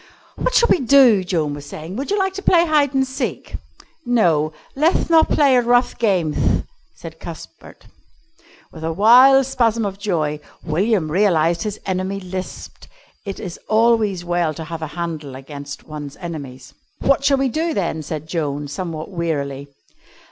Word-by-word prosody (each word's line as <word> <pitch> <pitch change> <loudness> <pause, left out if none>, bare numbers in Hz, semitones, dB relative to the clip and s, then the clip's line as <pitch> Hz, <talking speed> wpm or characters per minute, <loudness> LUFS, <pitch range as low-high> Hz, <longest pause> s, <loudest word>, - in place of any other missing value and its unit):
"What - - -2
shall 475 - +4
we - - +4
do?" 250 -6 +5
Joan 160 -5 -1
was 145 0 -9
saying. 160 +5 -8
"Would 275 +5 -4
you 410 - +1
like 385 -1 0
to 390 - -6
play 345 -3 +4
hide 295 -4 +2
and 265 0 +3
seek?" 260 -1 -5 0.5
"No; 170 - +2 0.2
leth 320 +4 +1
not 325 -1 +5
play 280 -3 +4
at 245 -1 +2
rough 245 +1 +3
gameth," 185 -9 +1 0.3
said - - -11
Cuthbert. - - -11 0.9
With 160 - -10
a 165 - -1
wild 250 +9 +6
spasm 230 -4 +1
of 195 -1 -5
joy 155 -7 -1 0.2
William 175 0 0
realised 170 -3 +2
that - - -3
his 210 -1 -4
enemy 190 +1 -2
lisped. 185 0 -8 0.4
It 195 - -5
is 180 -4 -7
always 215 -5 +2
well 175 -3 0
to 160 - -6
have 160 0 -7
a 160 - -3
handle 155 -5 -5
against 140 +1 -9
one's 150 -2 -8
enemies. 140 -7 -8 0.3
"What 275 0 +2
shall 280 -1 +3
we 270 0 +1
do, 320 +5 -1
then?" 170 -5 -2
said 155 0 -6
Joan, 150 -3 -3
somewhat 160 +2 -5
wearily. 140 -6 -3
185 Hz, 165 wpm, -20 LUFS, 155-245 Hz, 0.9 s, wild